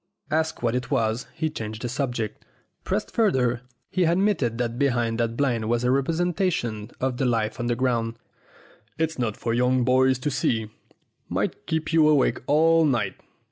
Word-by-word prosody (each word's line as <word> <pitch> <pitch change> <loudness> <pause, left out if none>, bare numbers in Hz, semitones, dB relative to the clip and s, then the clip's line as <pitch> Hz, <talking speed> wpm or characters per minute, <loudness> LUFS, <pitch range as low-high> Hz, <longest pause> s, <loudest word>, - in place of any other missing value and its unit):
Asked 160 -3 0
what 115 -1 +1
it 125 +1 -2
was, 110 +1 0
he 160 -1 -1
changed 110 -4 -6
the - - -1
subject. 120 -4 -3 0.4
Pressed - - -2
further, 130 - +2 0.3
he 185 - +2
admitted 170 - +1
that 120 0 -2
behind 120 -4 +1
that 115 0 -1
blind 120 -6 0
was 120 0 +1
a 125 - +3
representation 150 - 0
of 130 -1 -1
the 135 - 0
life 115 0 0
underground. 120 -1 0 0.8
"It's 160 -2 -1
not 110 -4 -1
for 115 - -2
young 125 +1 +2
boys 130 +1 +3
to 145 +3 -2
see. 110 -4 0 0.6
Might - - -2
keep 160 +1 -2
you 160 -2 +5
awake 145 -3 +3
all 165 +2 +4
night. 120 -10 +1
125 Hz, 160 wpm, -25 LUFS, 115-150 Hz, 0.8 s, you